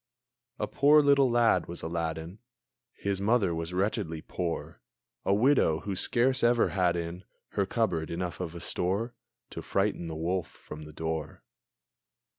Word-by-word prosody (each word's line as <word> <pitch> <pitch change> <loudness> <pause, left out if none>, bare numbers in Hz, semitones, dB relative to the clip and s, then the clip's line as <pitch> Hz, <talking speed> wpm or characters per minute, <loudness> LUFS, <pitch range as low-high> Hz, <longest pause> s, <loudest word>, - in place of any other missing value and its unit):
A - - -1
poor 150 +2 +5
little 140 -2 +5
lad 120 -1 +3
was 85 -1 -7
Aladdin! 80 +2 -3 0.5
His 100 -1 -2
mother 100 -4 +2
was 80 +1 -4
wretchedly 90 -4 -1
poor; 85 -2 -4 0.4
A - - +2
widow, 110 - +3
who 100 -2 -3
scarce 125 +7 +2
ever 120 0 +4
had 90 -3 +1
in 85 +2 -4 0.3
Her 100 -1 -1
cupboard 90 -8 0
enough 85 0 -4
of 85 -2 -4
a 85 - -7
store 100 +8 -1 0.4
To - - -6
frighten 95 -3 -1
the 80 - -5
wolf 85 +2 -1
from 75 0 -11
the 75 - -11
door. 80 -1 -4
90 Hz, 150 wpm, -29 LUFS, 85-115 Hz, 0.5 s, poor